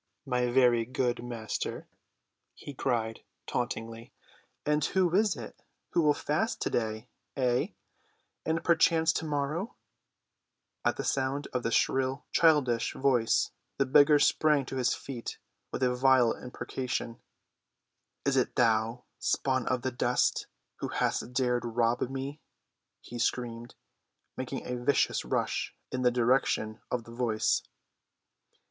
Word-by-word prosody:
"Aha! 135 - -11
my 125 0 +2
very 120 -2 +4
good 125 0 -1
master," 115 -3 -4 0.7
he 145 - -9
cried 115 -4 -1 0.3
tauntingly, 115 -1 -4 0.5
"and 150 0 +2
who 180 0 +2
is 210 +2 +3
it - - -9 0.3
who 170 - +3
will 150 -2 +4
fast 220 +10 -1
to‐day—ay, 120 +3 -2 0.7
and 160 +1 -1
perchance 165 -1 +4
to‐morrow!" 155 - -2 1.1
At - - 0
sound 135 +2 -1
of 125 - 0
the 115 - -1
shrill 130 +3 +1
childish 145 -8 +3
voice 125 -4 +2 0.3
the 135 - +2
beggar 145 +3 +6
sprang 150 -1 +3
to 130 - -5
his 125 -1 +2
feet 125 -4 -6 0.3
with - - -2
a 125 -1 +3
vile 125 -2 +4
imprecation. 125 -1 -4 1.0
"Is 140 -1 +2
it 130 - +1
thou, 115 0 +2 0.2
spawn 130 -3 0
of 125 -1 0
the 130 - -1
dust, 125 0 +1 0.3
who - - -3
hast - - -1
dared 125 -1 +1
rob 120 0 +1
me?" 135 +3 -5 0.6
he 120 - -8
screamed, 120 -1 -2 0.6
making 130 0 -5
a 125 -1 -4
vicious 140 +2 +2
rush - - -1 0.2
in 130 - -2
the 125 - +5
direction 120 -3 +1
of 125 -2 -2
the 115 - -13
voice. 115 -2 +1
125 Hz, 125 wpm, -30 LUFS, 120-140 Hz, 1.1 s, beggar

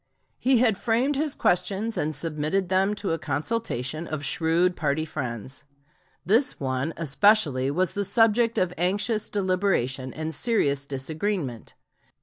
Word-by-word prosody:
He 260 0 +3
had 225 -5 +2
framed 245 +5 +1
his 295 0 -1
questions 200 +5 0
and 155 +1 -1
submitted 160 +5 -1
them 195 +2 +2
to 205 -3 -3
a 165 - -1
consultation 155 - -3
of 150 -2 -4
shrewd 170 +2 +2
party 155 +1 -1
friends. 130 -3 -6 0.6
This 225 +9 +2
one 130 +2 -1
especially 155 -4 +3
was 180 +5 0
the 205 - -1
subject 225 +3 +3
of 180 -1 +1
anxious 205 +4 0
deliberation 185 -10 0
and 160 +3 -5
serious 140 - 0
disagreement. 145 - -4
175 Hz, 130 wpm, -25 LUFS, 145-210 Hz, 0.6 s, He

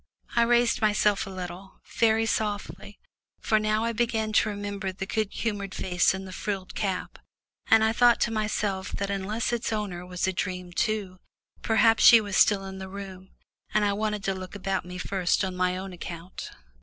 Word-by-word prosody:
I 235 - +4
raised 240 0 +3
myself 210 -2 +2
a - - -6
little, 185 0 -8 0.2
very 225 -1 +4
softly, 205 -3 -3 0.4
for 215 - +2
now 215 +1 +1
I 230 0 0
began 225 -2 0
to 215 - +3
remember 205 -1 -4
the 190 +1 -5
good 215 0 -1
humoured 200 -4 -3
face 180 0 +2
in 190 0 -6
the 185 - -9
frilled 195 -1 -4
cap, 190 -3 -3 0.5
and 220 0 +6
I 220 0 +3
thought 240 0 +5
to 235 - +2
myself 210 -3 -2
that 200 0 -2
unless 210 +5 -2
its 235 -1 -1
owner 205 -5 -3
were 180 0 -10
a 190 - 0
dream 180 0 -4
too, 200 -2 -1 0.4
perhaps 225 0 +4
she 235 - +10
was 205 -3 -4
still 195 -1 +4
in 190 0 -7
the 190 0 -7
room, 190 -1 -9 0.5
and 210 -1 +4
I 200 - +2
wanted 210 0 -2
to 195 - 0
look 185 +1 -8
about 195 -2 -2
me 180 0 -7
first 185 +1 0
on 185 -1 -4
my 180 0 0
own 190 0 -6
account. 175 +1 -8
200 Hz, 190 wpm, -27 LUFS, 185-215 Hz, 0.5 s, she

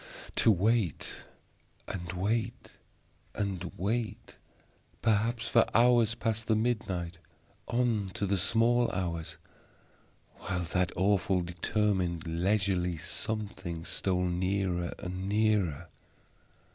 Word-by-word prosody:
To 115 - +6
wait 105 - 0 0.6
and 90 -2 -5
wait 105 +5 -2 0.6
and 100 -3 -2
wait 110 +4 -2 0.7
perhaps 115 +1 +1
for 115 - +4
hours 120 -2 +5
past 115 -1 -2
the 110 - +3
midnight 95 -7 -1 0.5
on 120 -5 +1
to 100 - -1
the 100 0 +1
small 115 +4 +3
hours 85 -3 -3 1.0
while 90 -1 -3
that 90 +1 0
awful, 95 0 +2
determined, 90 -1 0
leisurely 90 0 +1
Something 90 0 -3
stole 90 -1 0
nearer 90 -1 -1
and 95 +2 -5
nearer. 105 -7 +1
95 Hz, 95 wpm, -30 LUFS, 90-110 Hz, 1.0 s, To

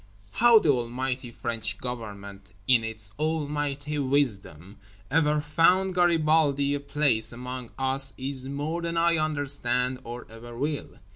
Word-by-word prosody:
How 235 -1 +6
the 165 - +3
Almighty 125 0 -2
French 110 -2 -2
Government 100 -5 -8
in 125 -3 +4
its 110 -2 -2
Almighty 150 -1 -2
Wisdom 105 - -1 0.3
ever 150 0 +3
found 165 +5 +2
Garibaldi 155 -5 +2
a 145 - -1
place 140 -5 +1
among 125 0 -7
us 135 0 -1
is 130 0 -4
more 150 +5 -3
than 170 0 -3
I 170 0 +3
understand 135 -5 +1
or 120 +1 -8
ever 115 +1 -11
will. 145 +3 -3
135 Hz, 130 wpm, -26 LUFS, 120-150 Hz, 0.3 s, How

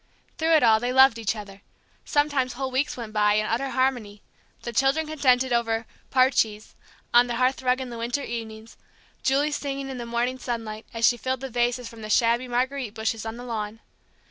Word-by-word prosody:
Through 325 0 +4
it 310 - +4
all 220 -2 +5
they 245 +2 -1
loved 265 -2 +6
each 220 -1 -1
other; 200 -2 -10 0.4
sometimes 290 -4 +1
whole 265 +1 -4
weeks 265 +2 -1
went 225 -3 -7
by 210 -1 +3
in 215 0 +1
utter 245 +5 -1
harmony; 245 -6 -1 0.4
the 235 - -5
children 270 +6 +2
contented 260 -5 +2
over 230 -1 0 0.2
"Parches" 235 -5 +2 0.4
on 240 +1 +6
the 240 - -2
hearthrug 255 +1 +1
in 255 -2 -6
the 235 - -7
winter 240 +5 -2
evenings, 225 -2 -7 0.4
Julie 280 +3 +2
singing 275 -2 -4
in 255 - -6
the 235 - -6
morning 240 +2 -1
sunlight, 225 -3 -5
as 230 0 +2
she 240 - +3
filled 260 +1 -3
the 270 -1 -6
vases 240 +1 0
from 230 -1 -11
the 215 - -7
shabby 235 +3 +2
marguerite 250 -1 -2
bushes 220 0 -2
on 225 +1 -5
the 245 - -8
lawn. 220 -2 -4
240 Hz, 195 wpm, -25 LUFS, 225-260 Hz, 0.4 s, loved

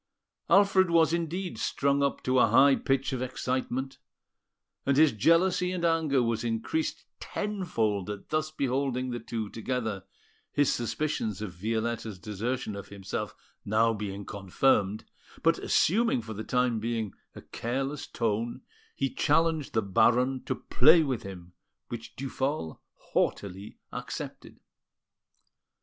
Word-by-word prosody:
Alfred 195 -2 +5
was, 165 -1 +4
indeed, 170 +2 -2
strung 140 0 +1
up 140 0 0
to 130 0 +2
a 125 - +6
high 135 +5 +6
pitch 135 0 0
of 130 - -2
excitement, 130 +1 -2 0.8
and 140 0 +2
his 155 0 +6
jealousy 175 - +3
and 180 -2 -1
anger 160 -6 +2
was 115 -1 -1
increased 120 - -2
tenfold 115 - -2
at 105 -1 -7
thus 155 0 0
beholding 130 -3 -1
the 120 - -3
two 115 -1 -4
together, 110 -3 -3 0.5
his 145 -1 +2
suspicions 120 -4 -2
of 105 -4 -5
Violetta's 110 +2 -2
desertion 110 +3 -3
of 100 0 -7
himself 100 +1 -5 0.3
being 105 -2 0
now - - -7
confirmed; 100 +1 +1 0.4
but, - - +3
assuming 210 - +2
for 110 0 -6
the 110 +1 -5
time 125 -1 +1
being 110 -2 -2 0.2
a - - -9
careless 135 +4 -3
tone, 115 +1 -2 0.3
he 135 - 0
challenged 155 +1 +1
the 110 - +2
Baron 125 +7 +3
to - - -1
play 155 +6 +5
with 130 -6 -2
him, 90 -2 -10 0.4
which 115 -1 -7
Duphol 135 - -3 0.2
haughtily 100 +1 -2 0.2
accepted. - - -7
125 Hz, 130 wpm, -28 LUFS, 110-145 Hz, 0.8 s, a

